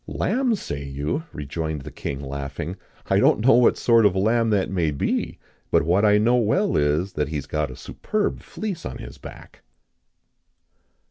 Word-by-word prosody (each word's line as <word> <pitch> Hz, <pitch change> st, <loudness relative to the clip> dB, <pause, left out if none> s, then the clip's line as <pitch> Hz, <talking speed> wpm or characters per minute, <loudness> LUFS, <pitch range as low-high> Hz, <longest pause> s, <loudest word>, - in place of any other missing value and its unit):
"Lamb, 255 Hz, -2 st, 0 dB
say 70 Hz, -, -5 dB
you?" 70 Hz, -, -3 dB
rejoined 75 Hz, +1 st, -4 dB
the -, -, -9 dB
king, 70 Hz, -, -5 dB
laughing; 70 Hz, +5 st, -5 dB, 0.3 s
"I -, -, +2 dB
don't -, -, +4 dB
know 135 Hz, -, +7 dB
what 120 Hz, 0 st, +5 dB
sort 115 Hz, -1 st, +4 dB
of 100 Hz, -3 st, +4 dB
a -, -, -1 dB
lamb 115 Hz, +4 st, +2 dB
that 100 Hz, -3 st, +2 dB
may 85 Hz, -5 st, +1 dB
be; 70 Hz, -2 st, -2 dB, 0.3 s
but -, -, +3 dB
what 90 Hz, +6 st, +2 dB
I 105 Hz, -1 st, +5 dB
know 120 Hz, +4 st, +3 dB
well 155 Hz, -, +1 dB
is, 75 Hz, +6 st, +1 dB
that 75 Hz, -, -1 dB
he 80 Hz, -, -5 dB
has 70 Hz, -, -3 dB
got 75 Hz, -2 st, -2 dB
a 65 Hz, -, -9 dB
superb 210 Hz, -, -3 dB
fleece 205 Hz, -6 st, -5 dB
on 65 Hz, -, -6 dB
his -, -, -10 dB
back." -, -, -12 dB
90 Hz, 185 wpm, -23 LUFS, 75-115 Hz, 0.3 s, know